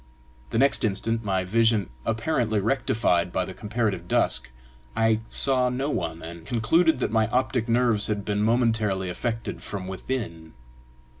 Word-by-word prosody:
The -, -, -2 dB
next 135 Hz, +3 st, +3 dB
instant, 115 Hz, +2 st, 0 dB
my 95 Hz, -3 st, 0 dB
vision 110 Hz, -, +2 dB, 0.2 s
apparently 115 Hz, -2 st, 0 dB
rectified 100 Hz, -6 st, +1 dB
by 95 Hz, -, 0 dB
the 95 Hz, -, -7 dB
comparative 105 Hz, -5 st, -2 dB
dusk, -, -, +2 dB, 0.5 s
I 110 Hz, -1 st, +3 dB
saw 130 Hz, -2 st, +1 dB
no 135 Hz, +4 st, -2 dB
one, 80 Hz, -, -3 dB
and 85 Hz, 0 st, -8 dB
concluded 160 Hz, -, +2 dB
that 125 Hz, -, -1 dB
my 110 Hz, -1 st, +2 dB
optic 125 Hz, -1 st, 0 dB
nerves 115 Hz, -3 st, +3 dB
had 105 Hz, -2 st, -2 dB
been 105 Hz, 0 st, 0 dB
momentarily 110 Hz, -5 st, +1 dB
affected 115 Hz, +5 st, -4 dB
from 95 Hz, -2 st, -6 dB
within. 95 Hz, -5 st, -5 dB
110 Hz, 145 wpm, -25 LUFS, 95-120 Hz, 0.5 s, next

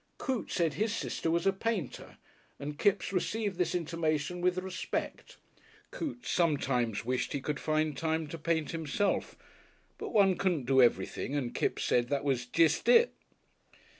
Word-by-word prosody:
Coote 255 Hz, -8 st, -2 dB
said 165 Hz, -4 st, +1 dB
his 210 Hz, +8 st, 0 dB
sister 165 Hz, -, -2 dB
was 170 Hz, +2 st, +1 dB
a 195 Hz, -, +4 dB
painter 195 Hz, -, -3 dB, 0.4 s
and 145 Hz, +1 st, -6 dB
Kipps 200 Hz, -1 st, +2 dB
received 205 Hz, +1 st, -1 dB
this 180 Hz, 0 st, +1 dB
intimation 165 Hz, 0 st, -1 dB
with 180 Hz, 0 st, +2 dB
respect. 185 Hz, 0 st, -4 dB, 0.5 s
Coote 285 Hz, -6 st, -5 dB
sometimes 125 Hz, -, +1 dB
wished 125 Hz, +1 st, -1 dB
he 140 Hz, -, -1 dB
could 145 Hz, +1 st, -3 dB
find 155 Hz, -1 st, 0 dB
time 160 Hz, +2 st, -1 dB
to 165 Hz, -, -6 dB
paint 160 Hz, -1 st, 0 dB
himself, 165 Hz, +5 st, -1 dB, 0.6 s
but -, -, -4 dB
one 195 Hz, -4 st, +4 dB
couldn't 175 Hz, -9 st, 0 dB
do 130 Hz, +1 st, +5 dB
everything 120 Hz, +4 st, +1 dB
and 130 Hz, -4 st, -2 dB
Kipps -, -, -1 dB
said 120 Hz, -1 st, +2 dB
that 140 Hz, -1 st, 0 dB
was 130 Hz, -3 st, 0 dB
"jest 160 Hz, -, +2 dB
it." 480 Hz, 0 st, +6 dB
160 Hz, 155 wpm, -31 LUFS, 140-185 Hz, 0.6 s, it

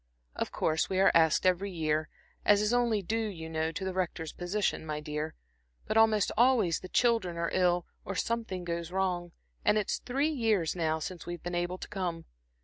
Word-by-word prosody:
Of -, -, -2 dB
course 160 Hz, 0 st, 0 dB
we 190 Hz, -, 0 dB
are 195 Hz, -, +6 dB
asked 160 Hz, +1 st, +4 dB
every 185 Hz, +2 st, +2 dB
year, 155 Hz, -3 st, -1 dB, 0.3 s
as 205 Hz, -1 st, +5 dB
is 210 Hz, +2 st, +1 dB
only 235 Hz, -4 st, +2 dB
due, 220 Hz, +4 st, -1 dB
you 165 Hz, -6 st, -6 dB
know, 160 Hz, 0 st, -1 dB
to 190 Hz, +4 st, -4 dB
the 190 Hz, -, -2 dB
Rector's 170 Hz, -3 st, -2 dB
position, 185 Hz, +2 st, -1 dB
my 155 Hz, -1 st, -3 dB
dear; 150 Hz, +1 st, -4 dB, 0.5 s
but 215 Hz, -, -2 dB
almost 220 Hz, -2 st, +4 dB
always 230 Hz, -7 st, +4 dB
the 185 Hz, -, -9 dB
children 225 Hz, -8 st, +2 dB
are 170 Hz, 0 st, -1 dB
ill, 180 Hz, -1 st, +2 dB, 0.2 s
or 195 Hz, -, -5 dB
something 225 Hz, -4 st, -2 dB
goes 170 Hz, 0 st, -4 dB
wrong, 180 Hz, -2 st, -1 dB, 0.3 s
and 215 Hz, -, +4 dB
it's 210 Hz, -, 0 dB
three 275 Hz, +5 st, 0 dB
years 220 Hz, -, +1 dB
now 160 Hz, -2 st, 0 dB
since 170 Hz, +3 st, -6 dB
we've 175 Hz, -1 st, -6 dB
been 175 Hz, -, -4 dB
able 175 Hz, +1 st, -1 dB
to -, -, -7 dB
come. 175 Hz, -4 st, -3 dB
180 Hz, 195 wpm, -30 LUFS, 165-210 Hz, 0.5 s, are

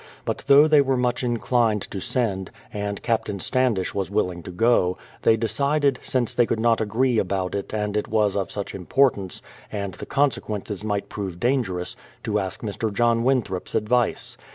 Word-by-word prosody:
But -, -, -2 dB
though 140 Hz, +2 st, +7 dB
they 150 Hz, -2 st, +6 dB
were 135 Hz, -1 st, +1 dB
much 125 Hz, 0 st, 0 dB
inclined 120 Hz, -3 st, +1 dB
to 100 Hz, -, -4 dB
send, 110 Hz, -5 st, -1 dB, 0.2 s
and 100 Hz, -1 st, -4 dB
Captain 110 Hz, -4 st, -1 dB
Standish 120 Hz, -5 st, +1 dB
was 95 Hz, -2 st, -2 dB
willing 90 Hz, -4 st, -1 dB
to 85 Hz, -, -9 dB
go, 90 Hz, -2 st, +2 dB, 0.2 s
they 110 Hz, -, +4 dB
decided, 140 Hz, +4 st, +1 dB
since 125 Hz, -3 st, 0 dB
they 120 Hz, -1 st, +3 dB
could 115 Hz, -, -1 dB
not 115 Hz, 0 st, +3 dB
agree 115 Hz, +3 st, +1 dB
about 95 Hz, -1 st, -1 dB
it 100 Hz, -, -4 dB
and 105 Hz, -1 st, -2 dB
it 105 Hz, -, 0 dB
was 105 Hz, -2 st, +1 dB
of 100 Hz, -2 st, -1 dB
such 100 Hz, -1 st, -4 dB
importance, 100 Hz, -1 st, +1 dB, 0.3 s
and 100 Hz, -3 st, -4 dB
the 90 Hz, -, -9 dB
consequences 105 Hz, -7 st, -1 dB
might 105 Hz, -2 st, -2 dB
prove 95 Hz, -4 st, -5 dB
dangerous, 115 Hz, -8 st, -1 dB, 0.3 s
to 105 Hz, -1 st, 0 dB
ask 95 Hz, -2 st, -4 dB
Mr. 110 Hz, +1 st, -2 dB
John 115 Hz, +2 st, +2 dB
Winthrop's 120 Hz, -8 st, 0 dB
advice. 115 Hz, +2 st, 0 dB
110 Hz, 175 wpm, -24 LUFS, 100-125 Hz, 0.3 s, though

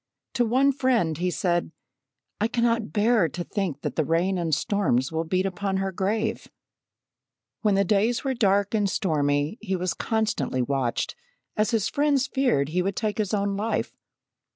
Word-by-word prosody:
To 240 Hz, -, +2 dB
one 260 Hz, +5 st, +3 dB
friend 250 Hz, -, +1 dB
he 180 Hz, +1 st, +1 dB
said: 175 Hz, -2 st, 0 dB, 0.7 s
"I 215 Hz, -, +2 dB
cannot 230 Hz, -4 st, 0 dB
bear 210 Hz, -2 st, +3 dB
to 175 Hz, +5 st, -5 dB
think 175 Hz, -8 st, -3 dB
that -, -, -3 dB
the 160 Hz, -, +2 dB
rain 175 Hz, +5 st, +1 dB
and 165 Hz, -2 st, -1 dB
storms 155 Hz, -, +1 dB
will 160 Hz, +1 st, -1 dB
beat 185 Hz, +3 st, 0 dB
upon 195 Hz, 0 st, -2 dB
her 195 Hz, 0 st, -1 dB
grave." 215 Hz, +5 st, -1 dB, 1.1 s
When 210 Hz, -3 st, +2 dB
the 195 Hz, -, +3 dB
days 215 Hz, +5 st, +1 dB
were 270 Hz, -1 st, 0 dB
dark 200 Hz, -3 st, +2 dB
and 205 Hz, -2 st, +2 dB
stormy 150 Hz, -, 0 dB
he 195 Hz, -4 st, -2 dB
was 180 Hz, 0 st, -1 dB
constantly 220 Hz, -, -1 dB
watched, 130 Hz, -2 st, -1 dB, 0.4 s
as 215 Hz, 0 st, +1 dB
his 225 Hz, -3 st, +1 dB
friends 285 Hz, -2 st, +2 dB
feared 245 Hz, -, +1 dB
he 180 Hz, +3 st, 0 dB
would 195 Hz, +1 st, -1 dB
take 215 Hz, -1 st, -2 dB
his 205 Hz, -3 st, 0 dB
own 200 Hz, -1 st, 0 dB
life. 215 Hz, +3 st, -2 dB
200 Hz, 170 wpm, -25 LUFS, 175-225 Hz, 1.1 s, one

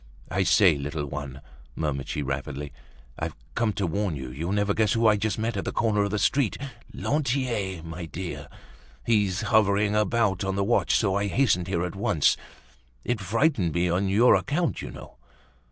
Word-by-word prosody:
"I 95 Hz, -, +1 dB
say, 90 Hz, -5 st, +4 dB
little 75 Hz, +1 st, -3 dB
one," 70 Hz, -1 st, -6 dB, 0.3 s
murmured 75 Hz, -4 st, -2 dB
she 75 Hz, -, -2 dB
rapidly, 70 Hz, +1 st, -4 dB, 0.5 s
"I've -, -, -3 dB, 0.2 s
come 115 Hz, -, +1 dB
to 100 Hz, -, -1 dB
warn 90 Hz, 0 st, -1 dB
you. 65 Hz, -2 st, -6 dB
You'll 80 Hz, +8 st, -4 dB
never 100 Hz, 0 st, +1 dB
guess 110 Hz, 0 st, +2 dB
who 115 Hz, -1 st, +1 dB
I 105 Hz, -1 st, +6 dB
just 105 Hz, -1 st, -1 dB
met 115 Hz, +1 st, -1 dB
at 100 Hz, -, -2 dB
the -, -, -3 dB
corner 110 Hz, -3 st, +1 dB
of 100 Hz, -, +1 dB
the 105 Hz, -, -1 dB
street. 130 Hz, +1 st, +1 dB, 0.3 s
Lantier, 125 Hz, -, -1 dB
my 85 Hz, +1 st, -6 dB
dear! 85 Hz, +4 st, -6 dB, 0.6 s
He's 105 Hz, -4 st, +2 dB
hovering 105 Hz, -1 st, +3 dB
about 105 Hz, -2 st, +1 dB
on 95 Hz, 0 st, -1 dB
the 100 Hz, -, +1 dB
watch; 120 Hz, +4 st, +2 dB
so 100 Hz, -4 st, +2 dB
I 100 Hz, +1 st, 0 dB
hastened 95 Hz, -6 st, +2 dB
here 90 Hz, -2 st, 0 dB
at 90 Hz, -, -6 dB
once. 85 Hz, -6 st, +2 dB, 0.7 s
It 120 Hz, -3 st, -1 dB
frightened 105 Hz, -, +1 dB
me 85 Hz, 0 st, +1 dB
on 95 Hz, +3 st, +1 dB
your 110 Hz, +6 st, +5 dB
account, 160 Hz, +4 st, 0 dB
you -, -, -6 dB
know." -, -, -11 dB
100 Hz, 185 wpm, -26 LUFS, 85-110 Hz, 0.7 s, I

